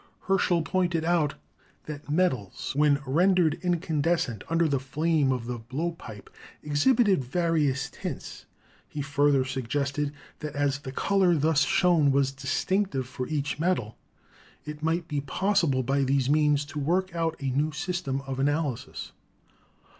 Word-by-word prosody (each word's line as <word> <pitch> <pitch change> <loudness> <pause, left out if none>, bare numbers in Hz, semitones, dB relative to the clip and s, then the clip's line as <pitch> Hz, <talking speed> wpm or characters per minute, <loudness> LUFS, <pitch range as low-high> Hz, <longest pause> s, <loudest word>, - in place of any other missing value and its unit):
Herschel 180 -3 +2
pointed 170 -1 0
out 165 -4 +1 0.5
that 150 -1 -8
metals, 145 - 0
when 145 -1 +4
rendered 170 +3 +3
incan 170 -4 0
descent 145 - 0
under 165 0 +2
the 140 -3 +1
flame 150 +1 +1
of 125 -3 -2
the 120 0 -4
blowpipe, 130 -3 -5 0.4
exhibited 190 - +3
vari 165 +2 +1
ous 135 +2 -2
tints. - - -7 0.4
He 145 - -4
further 140 -1 +2
suggested 140 +3 -2 0.3
that 150 -2 -6
as 145 0 0
the 135 -2 -7
color 190 +4 +2
thus 155 0 +2
shown 165 -4 +3
was 135 0 +2
distinctive 140 +3 -1
for 125 -1 -5
each 145 -2 -2
metal, 160 -11 0 0.7
it 150 0 -7
might 165 +1 0
be 145 -2 -2
possible 165 -3 +1
by 135 +2 +1
these 135 0 +1
means 150 -1 +3
to 150 0 -6
work 180 +6 0
out 165 -1 -1
a 135 -1 -2
new 145 +4 0
system 150 -4 -3
of 135 -1 -5
analysis. 145 -2 -2
150 Hz, 145 wpm, -27 LUFS, 135-170 Hz, 0.7 s, when